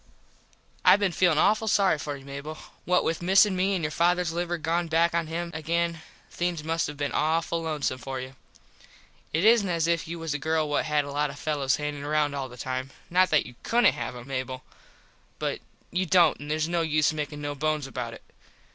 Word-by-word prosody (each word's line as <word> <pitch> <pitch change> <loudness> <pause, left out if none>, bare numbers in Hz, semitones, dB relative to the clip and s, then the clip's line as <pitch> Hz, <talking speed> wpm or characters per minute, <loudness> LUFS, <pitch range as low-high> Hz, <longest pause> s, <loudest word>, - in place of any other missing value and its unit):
I - - +8
been 200 -2 +1
feelin 175 -2 +3
awful 215 +6 +3
sorry 195 -6 +3
for 145 0 -4
you, 135 - -14
Mable. 140 +3 -7 0.3
What 180 0 +3
with 165 - -1
missin 190 +2 +5
me 190 +2 +1
and 175 - -2
your 150 - -1
fathers 175 0 +1
liver 175 0 -2
gone 170 +2 -1
back 165 +1 +2
on 170 -1 0
him 170 +2 -4
again 165 +1 -1 0.3
things 175 -3 -2
must 165 +1 0
have 150 - -7
been 145 -1 -2
awful 165 +1 0
lonesome 150 -5 -2
for 135 +1 -5
you. 130 +1 -8 1.0
It 160 +3 0
isnt 220 -4 +5
as 165 -2 +1
if 170 -1 0
you 170 +1 -5
was 165 -2 -3
a 145 - -2
girl 160 +1 0
what 145 - 0
had 150 -1 +1
a 140 - -6
lot 145 +1 0
of 140 - -9
fellos 145 -4 0
hangin 150 -1 -4
round 150 0 +1
all 135 -2 -4
the 125 - -12
time. 130 +1 -3 0.2
Not 185 +1 +4
that 155 - +3
you 125 - -10
couldnt 240 +1 +4
have - - -5
em, 120 0 -9
Mable, 130 -1 -4 0.7
but - - -2 0.3
you 185 +1 0
dont 170 -2 +4
an 145 +1 -8
theres 155 +1 0
no 170 0 0
use 155 -1 +2
makin 150 -1 -4
no 145 0 -3
bones 155 0 -1
about 120 -3 -5
it. - - -15
155 Hz, 215 wpm, -27 LUFS, 145-170 Hz, 1.0 s, I